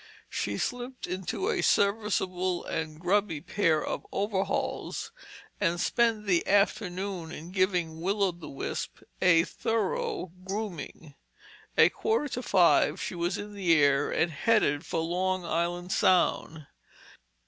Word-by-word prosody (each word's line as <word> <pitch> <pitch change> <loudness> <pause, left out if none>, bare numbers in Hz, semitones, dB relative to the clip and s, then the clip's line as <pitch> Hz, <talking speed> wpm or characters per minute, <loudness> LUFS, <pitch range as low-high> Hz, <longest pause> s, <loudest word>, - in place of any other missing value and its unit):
She 100 0 -2
slipped 245 - -4
into 190 - -3
a 420 -5 0
serviceable 190 -3 +1
and 155 -1 -4
grubby 180 -2 +1
pair 160 -2 +1
of - - -3
overalls, 200 - -2 0.5
and 175 -3 +1
spent 225 +1 +1
the 180 -4 +1
afternoon 195 -3 0
in 170 +1 -8
giving 180 -4 0
Will 200 +3 0
o' 190 - +3
the 170 -2 -11
Wisp 135 - -5 0.2
a 170 -2 +6
thorough 210 -4 -2
grooming. 190 -7 -6 0.6
At - - +6
quarter 440 -10 0
to 250 - -3
five 170 - +4
she - - -4
was 175 +1 -1
in 205 0 -7
the 185 -5 +3
air 140 0 +3
and 165 - +1
headed 150 -4 +1
for 165 - -1
Long 180 +2 -1
Island 175 +2 -2
Sound. 160 -4 +2
185 Hz, 130 wpm, -28 LUFS, 165-205 Hz, 0.6 s, a